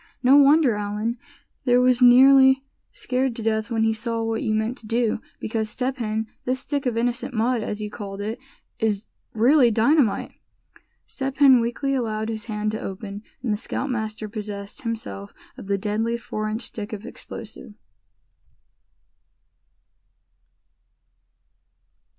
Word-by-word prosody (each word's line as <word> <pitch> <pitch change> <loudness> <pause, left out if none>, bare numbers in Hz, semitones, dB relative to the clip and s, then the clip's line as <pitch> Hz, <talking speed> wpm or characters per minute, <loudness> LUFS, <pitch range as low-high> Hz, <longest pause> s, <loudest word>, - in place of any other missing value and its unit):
No 260 +2 +6
wonder 285 -2 +5
Allan, 210 +3 -3 0.5
there, 245 -1 +4
was 250 0 +3
nearly 265 +2 +7 0.3
scared 255 -1 -1
to 230 - -5
death 220 -1 0
when 225 -2 0
he 225 0 +2
saw 230 +1 -2
what 225 0 -1
you 220 - -1
meant 220 +3 -1
to 220 - -11
do; 230 -1 0 0.2
because 220 -1 -2
Step 260 +4 -2
Hen, 220 -2 -2 0.2
this 255 +1 -1
stick 285 -2 -2
of 235 -2 -1
innocent 245 +2 -1
mud, 235 +2 +1
as 215 0 -4
you 210 - -5
called 200 -2 -7
it, 220 +4 -4 0.4
is 215 -1 0 0.3
really 245 +3 +5
dynamite!" 230 +1 +2 0.7
Step 270 -1 -4
Hen 265 -4 +7
weakly 240 +4 -1
allowed 220 -4 -2
his 220 0 -4
hand 215 -2 -2
to 215 - -5
open, 200 +1 -6 0.2
and 230 -5 0
the - - -1
scoutmaster 220 -3 -3
possessed 205 -1 -5
himself 225 -4 -5 0.2
of - - -10
the 200 0 +1
deadly 220 +3 -1
four 215 -2 -4
inch 220 +3 -3
stick 210 0 -6
of 210 +1 -6
explosive. 220 -3 -9
225 Hz, 145 wpm, -23 LUFS, 215-250 Hz, 0.7 s, nearly